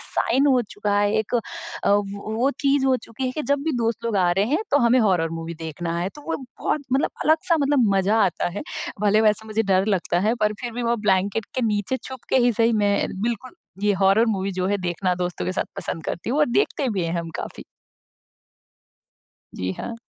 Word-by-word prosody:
Sign 275 Hz, +2 st, +1 dB
हो 260 Hz, -3 st, +4 dB
चुका 205 Hz, -1 st, 0 dB
है 205 Hz, 0 st, +2 dB
एक 220 Hz, +3 st, -2 dB
अ, 240 Hz, -, +3 dB, 0.5 s
वो 205 Hz, +1 st, -1 dB
वो 255 Hz, +4 st, +2 dB
चीज़ 275 Hz, -1 st, +2 dB
हो 260 Hz, -1 st, +4 dB
चुकी 230 Hz, +3 st, -6 dB
है 255 Hz, -, 0 dB
कि 305 Hz, -, -3 dB
जब 285 Hz, 0 st, +1 dB
भी 320 Hz, -, 0 dB
दोस्त 230 Hz, +1 st, -1 dB
लोग 230 Hz, -3 st, 0 dB
आ 180 Hz, -2 st, +3 dB
रहे 195 Hz, +3 st, +2 dB
हैं, 310 Hz, -, +1 dB
तो 285 Hz, -, +4 dB
हमें 240 Hz, 0 st, +4 dB
हॉरर 180 Hz, -7 st, +2 dB
मूवी 165 Hz, 0 st, -5 dB
देखना 165 Hz, +1 st, -4 dB
है। 180 Hz, +2 st, -1 dB
तो 295 Hz, -, -12 dB
वो -, -, 0 dB
बहुत 260 Hz, +3 st, -3 dB
मतलब 270 Hz, +2 st, +2 dB
अलग-सा 320 Hz, +2 st, +3 dB
मतलब 280 Hz, -3 st, +3 dB
मजा 195 Hz, +3 st, +2 dB
आता 175 Hz, -, 0 dB
है। -, -, -3 dB, 0.4 s
भले 210 Hz, +1 st, +4 dB
वैसा 220 Hz, 0 st, +2 dB
मुझे 220 Hz, +1 st, 0 dB
डर 190 Hz, 0 st, +2 dB
लगता 180 Hz, -3 st, +1 dB
है 230 Hz, -, +3 dB
पर 210 Hz, 0 st, +2 dB
फिर 240 Hz, -2 st, -4 dB
भी 245 Hz, +1 st, -4 dB
वो 235 Hz, 0 st, +1 dB
ब्लैंकेट 195 Hz, +3 st, +2 dB
के 255 Hz, -, -1 dB
नीचे 210 Hz, +4 st, 0 dB
छुपके 260 Hz, 0 st, -3 dB
ही 245 Hz, -, +3 dB
सही 230 Hz, +1 st, +2 dB
मैं 205 Hz, -2 st, +2 dB, 0.2 s
बिल्कुल 235 Hz, -, -3 dB, 0.3 s
ये 210 Hz, -, +3 dB
हॉरर 195 Hz, +4 st, +4 dB
मूवी 200 Hz, -3 st, -1 dB
जो 185 Hz, 0 st, -1 dB
है 205 Hz, +1 st, +1 dB
देखना 180 Hz, 0 st, -1 dB
दोस्तों 180 Hz, -1 st, -3 dB
के 185 Hz, -, -1 dB
साथ -, -, -1 dB
पसंद 160 Hz, -, -4 dB
करती 175 Hz, -, -4 dB
हूँ, 275 Hz, -, 0 dB
और 300 Hz, -, +4 dB
देखते 280 Hz, -, +1 dB
भी 195 Hz, -4 st, -1 dB
हैं 165 Hz, -, -2 dB
हम 165 Hz, -, -7 dB
काफ़ी। -, -, -7 dB, 1.9 s
जी, 90 Hz, 0 st, -3 dB
हाँ। 235 Hz, -, -5 dB
215 Hz, 220 wpm, -23 LUFS, 190-255 Hz, 1.9 s, हो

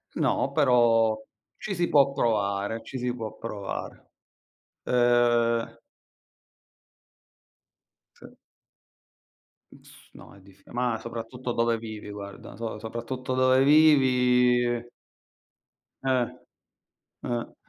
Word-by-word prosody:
No, 135 Hz, -, 0 dB
però 120 Hz, -6 st, +3 dB, 0.4 s
ci 200 Hz, -, -5 dB
si 175 Hz, -1 st, 0 dB
può 140 Hz, -2 st, +4 dB
provare, 105 Hz, -3 st, -1 dB
ci 135 Hz, -, -7 dB
si 125 Hz, -1 st, -2 dB
può 110 Hz, -3 st, -6 dB
provare. 100 Hz, -2 st, -7 dB, 0.8 s
Ehm 120 Hz, -1 st, +2 dB, 2.4 s
Sì. -, -, -15 dB, 1.3 s
Mh -, -, -17 dB
s -, -, -17 dB, 0.2 s
no, -, -, -14 dB
è -, -, -17 dB
diffi 100 Hz, +1 st, -21 dB
mah, 120 Hz, -1 st, -1 dB
soprattutto 115 Hz, +2 st, -6 dB
dove 115 Hz, 0 st, +1 dB
vivi, 110 Hz, -2 st, -8 dB
guarda. 100 Hz, -1 st, -9 dB
So 115 Hz, -2 st, -5 dB
soprattutto 125 Hz, +3 st, -5 dB
dove 130 Hz, +1 st, +4 dB
vivi 125 Hz, -5 st, +4 dB, 1.2 s
Eh. 130 Hz, -2 st, +1 dB, 1.0 s
Eh. 120 Hz, -1 st, -4 dB
120 Hz, 95 wpm, -26 LUFS, 115-130 Hz, 2.4 s, può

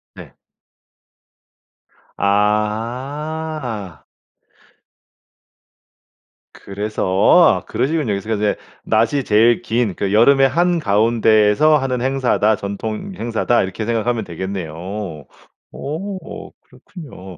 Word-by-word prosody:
네. -, -, -12 dB, 1.8 s
아. 115 Hz, -, -2 dB, 2.5 s
그래서. 105 Hz, +2 st, -5 dB, 0.6 s
아 -, -, -26 dB
그러시군요. 150 Hz, 0 st, -1 dB
그래서 100 Hz, +1 st, -5 dB
그 -, -, +1 dB
인제 105 Hz, -, -3 dB
근데 105 Hz, -, 0 dB, 0.2 s
낮이 115 Hz, +6 st, +1 dB
제일 115 Hz, +2 st, +3 dB
긴 115 Hz, -4 st, -1 dB
그 100 Hz, -1 st, -2 dB
여름의 135 Hz, +5 st, +5 dB
한가운데에서 115 Hz, -, +3 dB
하는 130 Hz, -3 st, -2 dB
행사다, 125 Hz, -5 st, +1 dB
전통 105 Hz, -, -5 dB
행사다. 120 Hz, -2 st, 0 dB
이렇게 95 Hz, +3 st, -4 dB
생각하면 115 Hz, 0 st, -1 dB
되겠네요. 90 Hz, -2 st, -5 dB, 1.0 s
어 185 Hz, +7 st, -6 dB
그렇군요. 95 Hz, -, -12 dB
115 Hz, 205 characters per minute, -19 LUFS, 105-135 Hz, 2.5 s, 여름의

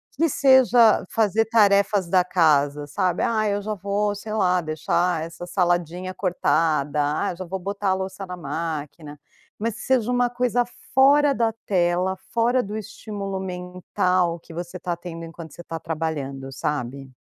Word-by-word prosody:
que 330 Hz, +4 st, +2 dB
seja 255 Hz, -4 st, +5 dB
fazer 225 Hz, 0 st, +2 dB
tarefas 200 Hz, -3 st, +3 dB
da 185 Hz, -1 st, +4 dB
casa, 150 Hz, -5 st, +2 dB
sabe: 180 Hz, +4 st, -1 dB
"Ah, 225 Hz, -2 st, +1 dB, 0.2 s
hoje 205 Hz, +1 st, -6 dB
eu 215 Hz, -, -1 dB
vou, 200 Hz, +2 st, -1 dB
sei 215 Hz, +1 st, -7 dB
lá, 180 Hz, -4 st, +2 dB
deixar 160 Hz, +2 st, 0 dB
essa 165 Hz, +2 st, -8 dB
saladinha 175 Hz, 0 st, -1 dB
cortada, 155 Hz, -5 st, 0 dB, 0.2 s
ah, 200 Hz, -, 0 dB
eu 170 Hz, -, -9 dB
já 185 Hz, -, -6 dB
vou 190 Hz, +2 st, -4 dB
botar 200 Hz, +1 st, -2 dB
a -, -, +4 dB
louça 190 Hz, +1 st, -5 dB
na 180 Hz, -1 st, -7 dB
máquina.", 150 Hz, -1 st, -5 dB, 0.4 s
mas 225 Hz, 0 st, -2 dB
que -, -, -9 dB
seja 250 Hz, -2 st, +1 dB
uma 245 Hz, 0 st, +2 dB
coisa 245 Hz, 0 st, +1 dB, 0.3 s
fora 280 Hz, +2 st, +5 dB
da 230 Hz, -3 st, +1 dB
tela, 180 Hz, 0 st, +1 dB, 0.2 s
fora 240 Hz, +2 st, +2 dB
do 205 Hz, +1 st, -6 dB
estímulo 205 Hz, -2 st, -6 dB
mental 180 Hz, -1 st, -1 dB
que 165 Hz, -, -14 dB
você 175 Hz, +2 st, -6 dB
tá 175 Hz, -1 st, -2 dB
tendo 170 Hz, -1 st, -8 dB
enquanto 165 Hz, -2 st, -10 dB
você 170 Hz, -, -10 dB
tá 165 Hz, -1 st, -6 dB
trabalhando, 145 Hz, -5 st, -4 dB
sabe? 135 Hz, -2 st, -4 dB
180 Hz, 165 wpm, -23 LUFS, 165-210 Hz, 0.4 s, seja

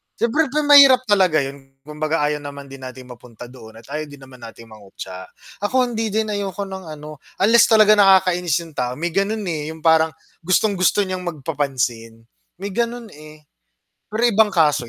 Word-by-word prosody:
Siyempre 295 Hz, +7 st, 0 dB
ga 295 Hz, +3 st, -1 dB
mahirap 280 Hz, -3 st, +7 dB
talaga 185 Hz, -8 st, +2 dB
'yun 135 Hz, 0 st, -10 dB
kumbaga 150 Hz, +1 st, -3 dB
ayaw 150 Hz, 0 st, -1 dB
naman 140 Hz, -1 st, -9 dB
din 135 Hz, -, -10 dB
natin 130 Hz, 0 st, -10 dB
mapunta 120 Hz, 0 st, -13 dB
doon 110 Hz, -4 st, -14 dB
at -, -, -22 dB
ayaw 155 Hz, +1 st, -4 dB
din 145 Hz, -1 st, -14 dB
naman 130 Hz, -1 st, -15 dB
natin 115 Hz, 0 st, -12 dB
mangutya. 95 Hz, -3 st, -10 dB, 0.4 s
Ako 255 Hz, +4 st, +1 dB
hindi 225 Hz, -1 st, -2 dB
din 220 Hz, 0 st, -1 dB
ayoko 200 Hz, -1 st, -4 dB
ng 190 Hz, -1 st, -9 dB
ano 150 Hz, -1 st, -10 dB, 0.2 s
unless 230 Hz, +3 st, +5 dB
talaga 215 Hz, -1 st, +5 dB
nakakainis 180 Hz, -4 st, +3 dB
yung 165 Hz, -, -13 dB
tao 125 Hz, -2 st, -3 dB
may 170 Hz, +4 st, -3 dB
gano'n, 205 Hz, +4 st, -1 dB
eh, 155 Hz, -4 st, -4 dB
yung 160 Hz, -, -17 dB
parang 160 Hz, 0 st, +4 dB, 0.3 s
gustong-gusto 185 Hz, +2 st, +1 dB
niyang 185 Hz, -1 st, -5 dB
magpapansin, 130 Hz, -8 st, -4 dB, 0.3 s
may 200 Hz, +2 st, -6 dB
gano'n, 235 Hz, +1 st, -3 dB
eh. 155 Hz, 0 st, -15 dB, 0.7 s
Pero 215 Hz, +3 st, -4 dB
ibang 220 Hz, -1 st, +3 dB
kaso 150 Hz, -9 st, +1 dB
160 Hz, 175 wpm, -20 LUFS, 135-205 Hz, 0.7 s, mahirap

